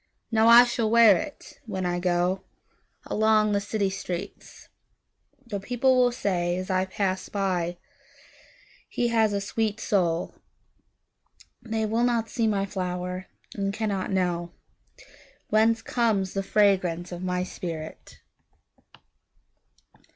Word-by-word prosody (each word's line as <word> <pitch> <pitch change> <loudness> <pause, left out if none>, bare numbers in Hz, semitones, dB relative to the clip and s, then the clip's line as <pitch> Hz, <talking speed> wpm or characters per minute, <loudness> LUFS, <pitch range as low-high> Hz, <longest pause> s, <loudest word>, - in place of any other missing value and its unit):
Now 220 0 +4
I 235 +1 +10
shall 235 -2 -1
wear 225 -6 +5 0.4
itWhen 190 -2 -3
I 175 0 -1
goAlong 195 +4 -1
the 200 - +1
city 200 -1 -1
streets:The 200 +5 -9
people 245 +5 +1
will 250 -1 +4
sayAs 185 -5 -2
I 185 0 +1
pass 190 0 -2
by—"He 210 - -5
has 220 -2 +2
a 200 - -1
sweet 215 +1 -2
soul!"They 205 +4 -5
will 225 +2 0
not 235 -2 +1
see 230 -2 0
my 200 -2 0
flower, 180 -1 -4 0.3
And 195 -1 -2
cannot 200 -3 -2 1.4
knowWhence 225 +1 +3
comes 215 -6 0
the 195 - -1
fragrance 185 -4 +1
of 175 0 -6
my 180 0 -1
spirit! 165 -3 -8
200 Hz, 100 wpm, -26 LUFS, 185-225 Hz, 1.4 s, I